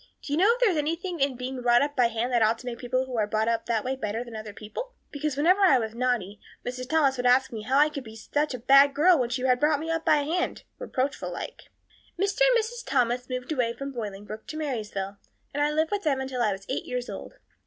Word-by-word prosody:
Do 285 - -4
you - - +2
know 400 +5 +6
if - - -10
there 485 -5 +4
is 335 - -1
anything 335 +4 -2
in 275 -1 +1
being 250 +1 -5
brought 240 +1 +4
up 290 0 -3
by 245 -2 +4
hand 230 +2 -2
that 240 - +3
ought 220 +1 +3
to 250 - -13
make 240 -1 -5
people 255 +1 -1
who 255 -2 -5
are 215 -2 +1
brought 215 +1 0
up 230 -1 0
that 230 -2 0
way 260 +1 -1
better 225 -2 -3
than 235 -2 -10
other 215 -1 -6
people? 220 - -7 0.2
Because 290 -1 -3
whenever 360 +7 +4
I 360 -9 +6
was 220 -2 -3
naughty 230 -5 -1 0.3
Mrs. 255 +1 -5
Thomas 285 -4 +3
would 250 0 +1
ask 260 +1 +4
me 225 -2 -5
how 260 +5 +1
I 295 +1 +6
could 280 -3 -6
be 220 -2 -11
such 290 +6 -1
a - - -4
bad 275 +3 +6
girl 335 +2 +5
when 245 -2 0
she 250 +1 -2
had 250 -1 +3
brought 300 0 +3
me 325 +2 -3
up 325 0 -1
by 300 -2 +3
hand 340 +5 -2 0.2
reproachful 280 - -2
like. - - -7 0.5
"Mr. 400 +4 0
and - - +6
Mrs. 470 +2 -4
Thomas 250 -1 0
moved 255 +2 -4
away 245 -6 0
from 275 +3 -6
Bolingbroke 215 -2 -7
to 310 - -6
Marysville, 210 -9 -4 0.4
and 290 - -1
I 295 - +3
lived 315 +1 0
with 410 -1 0
them 290 -6 +1
until 265 -2 -3
I 215 - +3
was 195 0 -6
eight 265 - -3
years 250 0 -3
old. - - -8
255 Hz, 260 wpm, -27 LUFS, 235-300 Hz, 0.5 s, know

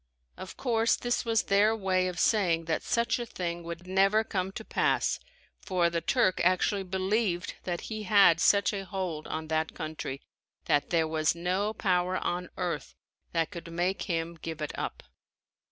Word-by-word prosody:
Of 185 - -9
course 230 -3 +2
this 245 0 -1
was 225 -1 +2
their 205 +3 +3
way 185 -3 +1
of 180 -1 -4
saying 175 -7 +2
that 160 -1 -1
such 235 +1 0
a 240 - -3
thing 175 -4 -4
would 170 +1 -7
never 195 +4 +3
come 190 -3 -2
to - - -7
pass - - +1 0.4
for 175 -3 +1
the 170 0 -1
Turk 235 -5 +2
actually 185 +3 +2
believed 190 0 -1
that 175 -2 -2
he 215 -1 -5
had 195 -5 +5
such 200 +3 +4
a 195 -1 -3
hold 185 -5 -4
on 160 0 -4
that 160 0 -1
country 155 -3 -5 0.4
that 145 - +2
there 165 -2 +2
was 155 0 +1
no 185 +5 0
power 185 -2 +1
on 180 +1 -2
earth 170 -5 -3 0.4
that 165 +1 0
could 170 -3 -8
make 175 +3 -1
him 165 0 -1
give 165 -1 -5
it 150 -1 -4
up. - - -5
180 Hz, 170 wpm, -29 LUFS, 170-200 Hz, 0.4 s, had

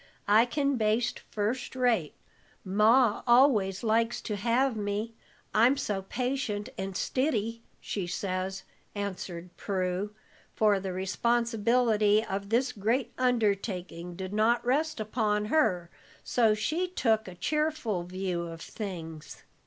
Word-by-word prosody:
I 220 +4 +5
can 280 +1 0
baste 225 +2 +1
first 225 +6 -2
rate. 235 - +1 0.5
Ma 215 +4 +4
always 240 -6 +4
likes 230 +1 +1
to 210 - -3
have 235 +5 +1
me, 210 +2 -3 0.4
I'm 240 +6 +5
so 200 -6 -2
patient 245 0 -2
and 190 -1 -4
stiddy, 230 -5 -1 0.2
she 190 -4 -4
says," 190 +1 -3 0.3
answered 180 -3 -5
Prue, 190 +1 -2 0.4
for 210 -2 +3
the 190 0 -4
responsibility 225 +2 +2
of 200 +1 -4
this 250 +4 +2
great 225 +5 -1
undertaking 200 -7 -1
did 190 +2 -6
not 230 +3 +2
rest 300 +3 +1
upon 210 -1 0
her, 185 - +1 0.3
so 225 -3 +3
she 310 +12 -1
took 225 - +1
a 185 - -8
cheerful 300 - -1
view 180 -1 -3
of 165 -1 -8
things. 165 -5 -7
215 Hz, 120 wpm, -29 LUFS, 190-240 Hz, 0.5 s, I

